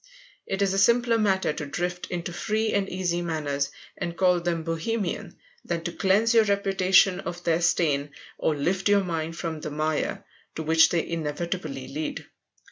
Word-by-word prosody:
It 195 +1 0
is 195 -1 +1
a 195 - +1
simpler 235 +2 +4
matter 190 -6 +2
to 150 - -5
drift 175 +5 -3
into 175 -1 -4
free 215 +4 -1
and 200 -1 0
easy 175 -2 -1
manners 145 -4 -1 0.3
and 170 0 -5
call 180 -2 +4
them 170 -1 -2
"bohemian" 170 +5 -3 0.3
than 170 -1 -3
to 175 - -3
cleanse 200 +6 +2
your 225 -1 +6
reputation 195 -2 +3
of 175 -2 -6
their 165 0 +1
stain, 150 -4 +2 0.3
or 155 - +1
lift 185 +7 0
your 200 -1 +4
mind 165 -2 -3
from 160 -2 -4
the 155 - -4
mire 155 +1 -1 0.3
to 160 - -3
which 160 +1 +5
they 170 -2 0
inevitably 155 -3 -3
lead. 150 +3 -4
175 Hz, 170 wpm, -26 LUFS, 160-195 Hz, 0.3 s, your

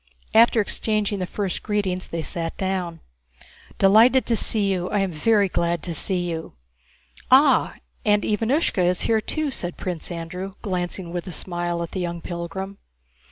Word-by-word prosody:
After 230 +1 +6
exchanging 210 -1 0
the 180 - -2
first 195 -2 -2
greetings, 195 -4 -1
they 165 -1 -4
sat 165 0 -4
down. 185 -4 -2 0.4
* - - -20 0.3
"Delighted 225 +7 +6
to 235 - +2
see 210 -2 +2
you. 180 -1 -1
I 205 -1 +1
am 195 -2 0
very 200 +6 +3
glad 170 -2 -1
to 175 - -3
see 180 +1 -1
you." 160 -1 -5 0.8
"Ah, - - +5 0.3
and 210 0 +3
Ivánushka 225 - +1
is 180 0 +2
here 220 -1 +2
too!" 305 +5 -2
said 175 -8 -5
Prince 180 -4 -4
Andrew, 180 +3 -5
glancing 180 -3 -3
with 175 0 -4
a - - -5
smile 175 -1 -2
at 170 - -7
the 190 - -4
young 170 -1 -3
pilgrim. 180 +4 -6
185 Hz, 165 wpm, -23 LUFS, 175-210 Hz, 0.8 s, After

